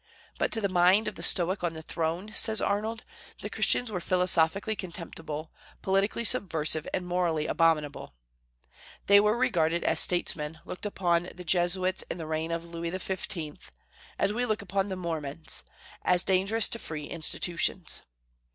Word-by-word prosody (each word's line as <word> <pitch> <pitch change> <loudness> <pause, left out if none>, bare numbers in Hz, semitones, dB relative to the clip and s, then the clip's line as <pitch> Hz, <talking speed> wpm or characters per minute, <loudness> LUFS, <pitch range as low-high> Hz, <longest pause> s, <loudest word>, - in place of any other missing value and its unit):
But - - +1
to 225 - 0
the 200 - +2
mind 185 +3 +4
of - - -2
the - - -10
Stoic 185 +1 +1
on 170 -2 0
the 160 0 -8
throne, 170 +7 -3
says 220 -2 +3
Arnold, 220 +3 -1 0.4
the - - -5
Christians 245 -3 +2
were 185 - -2
"philosophically 180 +3 +2
contemptible, 165 -4 -6 0.3
politically 195 +4 +1
subversive, 165 -10 +1
and 180 - -2
morally 175 -3 0
abominable." 150 - +1 0.9
They 200 0 +7
were 210 +2 +3
regarded 170 -8 +1
as - - +3
statesmen 160 -3 0
looked 185 - -5
upon 175 -3 0
the 180 0 -9
Jesuits 185 +2 +1
in - - -3
the 165 - -5
reign 160 +1 -2
of 165 0 -3
Louis 170 0 -5
XV., 175 -4 -4 0.6
as 205 - +1
we 245 +3 0
look 215 -4 -1
upon 195 0 -1
the 190 - -2
Mormons, 160 -4 -4 0.4
as 180 0 +2
dangerous 195 +4 +3
to 230 - -3
free 155 -6 -5
institutions. 170 +2 -1
180 Hz, 155 wpm, -28 LUFS, 165-195 Hz, 0.9 s, They